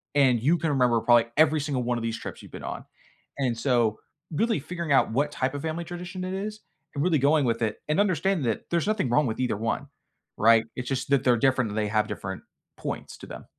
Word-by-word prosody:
And 130 Hz, -5 st, +4 dB
you 160 Hz, +8 st, +3 dB
can 160 Hz, 0 st, -1 dB
remember 125 Hz, -5 st, +3 dB
probably 120 Hz, -1 st, +5 dB
every 155 Hz, 0 st, +5 dB
single 140 Hz, -4 st, -1 dB
one 120 Hz, 0 st, 0 dB
of 115 Hz, -, -4 dB
these 115 Hz, 0 st, -2 dB
trips -, -, -8 dB
you've -, -, -14 dB
been -, -, -9 dB
on. -, -, -6 dB, 0.5 s
And 120 Hz, -4 st, 0 dB
so 115 Hz, -3 st, +1 dB, 0.3 s
really 225 Hz, +2 st, +1 dB
figuring 170 Hz, +1 st, -5 dB
out 135 Hz, -4 st, +4 dB
what 145 Hz, +5 st, +1 dB
type 130 Hz, 0 st, -1 dB
of 145 Hz, -, -4 dB
family 160 Hz, +1 st, -3 dB
tradition 180 Hz, +1 st, -6 dB
it 185 Hz, +1 st, -3 dB
is 210 Hz, +2 st, -4 dB, 0.4 s
and 140 Hz, -, 0 dB
really 165 Hz, -4 st, +3 dB
going 145 Hz, +1 st, +3 dB
with 115 Hz, 0 st, 0 dB
it 110 Hz, -2 st, 0 dB
and 155 Hz, +5 st, +1 dB
understanding 185 Hz, -5 st, +1 dB
that 115 Hz, -, -1 dB
there's 170 Hz, +2 st, 0 dB
nothing 215 Hz, -, +1 dB
wrong 150 Hz, +5 st, +3 dB
with 110 Hz, -, -3 dB
either 125 Hz, -5 st, 0 dB
one, 115 Hz, +5 st, -2 dB, 0.5 s
right? 115 Hz, +1 st, +5 dB
It's 130 Hz, 0 st, -5 dB
just 135 Hz, 0 st, -2 dB
that 140 Hz, -2 st, +3 dB
they're 125 Hz, -2 st, +4 dB
different, 130 Hz, -3 st, +2 dB
and 105 Hz, -, -5 dB
they 105 Hz, -1 st, +1 dB
have 105 Hz, +1 st, +1 dB
different 95 Hz, -3 st, -6 dB, 0.3 s
points -, -, -6 dB
to -, -, -10 dB
them. -, -, -9 dB
135 Hz, 235 wpm, -26 LUFS, 115-160 Hz, 0.5 s, probably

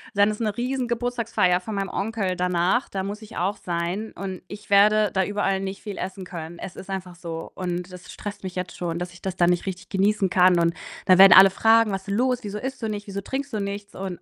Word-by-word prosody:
Dann 205 Hz, +1 st, +4 dB
ist 210 Hz, -, -6 dB
'ne 215 Hz, -3 st, -1 dB
riesen 250 Hz, +1 st, -2 dB
Geburtstagsfeier 235 Hz, -6 st, +1 dB
von 210 Hz, +3 st, -6 dB
meinem 195 Hz, -1 st, -2 dB
Onkel 195 Hz, -3 st, -2 dB
danach, 180 Hz, +7 st, +1 dB
da 190 Hz, -1 st, -4 dB
muss 205 Hz, +3 st, -5 dB
ich 220 Hz, +1 st, -11 dB
auch 195 Hz, +4 st, -1 dB
sein 175 Hz, +5 st, -3 dB
und 190 Hz, -2 st, -6 dB
ich 205 Hz, +2 st, -10 dB
werde 210 Hz, 0 st, +5 dB
da 190 Hz, -1 st, +2 dB
überall 205 Hz, -1 st, 0 dB
nicht 195 Hz, 0 st, -5 dB
viel 205 Hz, -3 st, -6 dB
essen 190 Hz, 0 st, -5 dB
können. 170 Hz, -1 st, -8 dB
Es 185 Hz, -, -8 dB
ist 190 Hz, -, -10 dB
einfach 185 Hz, -2 st, -5 dB
so 165 Hz, -2 st, -7 dB
und 180 Hz, 0 st, -4 dB
das 180 Hz, -1 st, -11 dB
stresst 205 Hz, -1 st, -7 dB
mich 185 Hz, -1 st, -6 dB
jetzt 180 Hz, 0 st, -5 dB
schon, 170 Hz, -1 st, -3 dB
dass 175 Hz, 0 st, -5 dB
ich 175 Hz, 0 st, -16 dB
das 190 Hz, -2 st, -4 dB
dann 175 Hz, -1 st, +3 dB
nicht 175 Hz, -1 st, +1 dB
richtig 185 Hz, -2 st, -6 dB
genießen 195 Hz, 0 st, +2 dB
kann, 180 Hz, -1 st, +5 dB
und 170 Hz, 0 st, +2 dB, 0.3 s
da 185 Hz, -, +7 dB
werden 195 Hz, -1 st, +10 dB
alle 195 Hz, +2 st, +10 dB
fragen: 225 Hz, +2 st, +4 dB
„Was 195 Hz, -1 st, -4 dB
denn 200 Hz, -, -2 dB
los? 250 Hz, +2 st, +1 dB
Wieso 205 Hz, 0 st, -5 dB
isst 265 Hz, +4 st, -5 dB
du 225 Hz, -, -1 dB
nicht? 205 Hz, -1 st, -4 dB
Wieso 200 Hz, 0 st, -4 dB
trinkst 275 Hz, +7 st, -4 dB
du 215 Hz, -, -2 dB
nichts?“ 200 Hz, 0 st, -5 dB
Und 185 Hz, -2 st, -5 dB
195 Hz, 245 wpm, -24 LUFS, 180-210 Hz, 0.3 s, werden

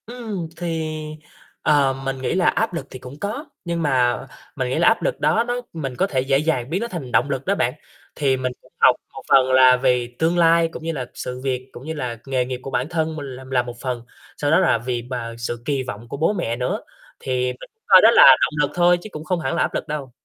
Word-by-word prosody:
Ừm, 220 Hz, -7 st, -5 dB
thì, 160 Hz, -2 st, -3 dB, 0.7 s
ờ, 140 Hz, -3 st, +3 dB
mình 135 Hz, 0 st, -2 dB
nghĩ 130 Hz, -, -1 dB
là 180 Hz, -1 st, +2 dB
áp -, -, +1 dB
lực 165 Hz, -, -5 dB
thì 130 Hz, -, -9 dB
cũng 130 Hz, +3 st, -11 dB
có, 215 Hz, -, -4 dB, 0.2 s
nhưng 170 Hz, -1 st, -2 dB
mà 125 Hz, -4 st, +2 dB, 0.4 s
mình 130 Hz, -2 st, -2 dB
nghĩ 130 Hz, -, -1 dB
là 170 Hz, -, +4 dB
áp 225 Hz, -, +4 dB
lực -, -, -1 dB
đó 230 Hz, -, +2 dB
nó 245 Hz, +1 st, -2 dB
mình 135 Hz, -6 st, -4 dB
có 190 Hz, -, +1 dB
thể 130 Hz, -8 st, 0 dB
dễ 135 Hz, +1 st, +2 dB
dàng 140 Hz, -4 st, -1 dB
biến 180 Hz, +6 st, -1 dB
nó 235 Hz, -, -2 dB
thành 165 Hz, -, -6 dB
động 140 Hz, -, +2 dB
lực 135 Hz, -1 st, -3 dB
đó 200 Hz, -, +1 dB
bạn. 125 Hz, -9 st, 0 dB, 0.4 s
Thì 135 Hz, -3 st, +1 dB
mình 130 Hz, -1 st, -2 dB
cũng -, -, -23 dB
học -, -, +6 dB, 0.2 s
một -, -, -8 dB
phần 130 Hz, -1 st, +5 dB
là 130 Hz, -1 st, +7 dB
vì 125 Hz, -2 st, +1 dB
tương 165 Hz, +2 st, +2 dB
lai, 165 Hz, 0 st, +5 dB
cũng -, -, -9 dB
như 165 Hz, -, -2 dB
là 135 Hz, -6 st, -4 dB
sự 125 Hz, 0 st, -6 dB
việc 130 Hz, -1 st, -2 dB
cũng 125 Hz, -, -11 dB
như 160 Hz, -, -4 dB
là 125 Hz, -6 st, -4 dB
nghề 130 Hz, -2 st, 0 dB
nghiệp 125 Hz, 0 st, -5 dB
của 135 Hz, -, -6 dB
bản 130 Hz, +3 st, -1 dB
thân 160 Hz, -2 st, -1 dB
mình 145 Hz, -2 st, -6 dB
l -, -, -10 dB
là 125 Hz, -1 st, +3 dB
một 120 Hz, -1 st, -8 dB
phần, 125 Hz, -3 st, -3 dB, 0.4 s
sau 145 Hz, 0 st, 0 dB
đó 160 Hz, -, +5 dB
là 180 Hz, -10 st, +3 dB
vì 120 Hz, +1 st, -3 dB
bà 120 Hz, -1 st, -5 dB
sự 120 Hz, 0 st, -4 dB
kỳ 140 Hz, -2 st, 0 dB
vọng 120 Hz, -2 st, -7 dB
của 140 Hz, -, -5 dB
bố 165 Hz, +8 st, +2 dB
mẹ 115 Hz, -, -2 dB
nữa, 130 Hz, -, -2 dB, 0.4 s
thì 125 Hz, -1 st, -1 dB
mình -, -, -11 dB, 0.2 s
coi -, -, +8 dB
đó -, -, +7 dB
là -, -, +8 dB, 0.2 s
động 155 Hz, -, +1 dB
lực 145 Hz, -, 0 dB
thôi 175 Hz, 0 st, +4 dB
chứ 215 Hz, -, -9 dB
cũng 150 Hz, -, -7 dB
không 175 Hz, +2 st, -1 dB
hẳn 130 Hz, -4 st, -2 dB
là -, -, +1 dB
áp -, -, 0 dB
lực -, -, -3 dB
đâu. 145 Hz, -3 st, -5 dB
140 Hz, 260 wpm, -22 LUFS, 125-165 Hz, 0.7 s, coi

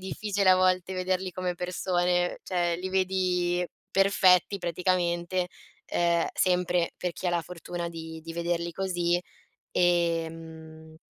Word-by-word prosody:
difficile 200 Hz, +1 st, -1 dB
a 185 Hz, -, +7 dB
volte 185 Hz, 0 st, +2 dB
vederli 185 Hz, 0 st, -1 dB
come 180 Hz, 0 st, -2 dB
persone. 180 Hz, 0 st, 0 dB
Cioè 175 Hz, -2 st, 0 dB
li 185 Hz, +2 st, -4 dB
vedi 180 Hz, -2 st, +1 dB, 0.2 s
perfetti 195 Hz, -1 st, +4 dB
praticamente, 175 Hz, 0 st, 0 dB, 0.4 s
ehm, 170 Hz, -1 st, +1 dB
sempre 180 Hz, -2 st, +1 dB
per 180 Hz, -1 st, -2 dB
chi 185 Hz, -, -5 dB
ha -, -, +2 dB
la 175 Hz, -1 st, +1 dB
fortuna 175 Hz, +1 st, -6 dB
di 160 Hz, -1 st, -8 dB
di 165 Hz, +1 st, -7 dB
vederli 170 Hz, 0 st, -1 dB
così. 175 Hz, -1 st, 0 dB, 0.5 s
Ehm, 165 Hz, -2 st, -1 dB
175 Hz, 125 wpm, -28 LUFS, 170-185 Hz, 0.5 s, a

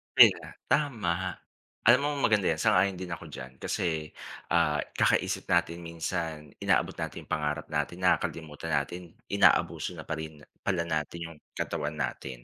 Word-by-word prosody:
Yun -, -, +10 dB
nga, -, -, -10 dB, 0.2 s
tama. 95 Hz, -, +1 dB, 0.5 s
Alam 125 Hz, +3 st, +8 dB
mo 145 Hz, -, +2 dB, 0.2 s
maganda 105 Hz, -5 st, +3 dB
yan, 80 Hz, -, -2 dB
sang-ayon 95 Hz, -2 st, +3 dB
din 90 Hz, -2 st, -6 dB
ako 85 Hz, -, -6 dB
diyan. 65 Hz, 0 st, -9 dB
Kasi, 80 Hz, -3 st, -2 dB, 0.4 s
ah, 75 Hz, -3 st, +3 dB, 0.2 s
kakaisip -, -, +2 dB
natin 85 Hz, +1 st, +2 dB
minsan, 80 Hz, -2 st, -4 dB
inaabot -, -, +2 dB
natin -, -, -5 dB
yung -, -, -20 dB
pangarap 75 Hz, 0 st, -1 dB
natin, 75 Hz, +4 st, -1 dB
nakakalimutan 80 Hz, -4 st, 0 dB
natin, 90 Hz, -1 st, -3 dB, 0.2 s
inaabuso -, -, +3 dB
na -, -, -7 dB
pa 80 Hz, -, -1 dB
rin 80 Hz, -2 st, -8 dB, 0.2 s
pala 90 Hz, -3 st, +1 dB
natin 85 Hz, +2 st, -3 dB
yung 80 Hz, -, -14 dB, 0.2 s
katawan 75 Hz, +1 st, -2 dB
natin. 65 Hz, -4 st, -4 dB
80 Hz, 155 wpm, -29 LUFS, 75-90 Hz, 0.5 s, Yun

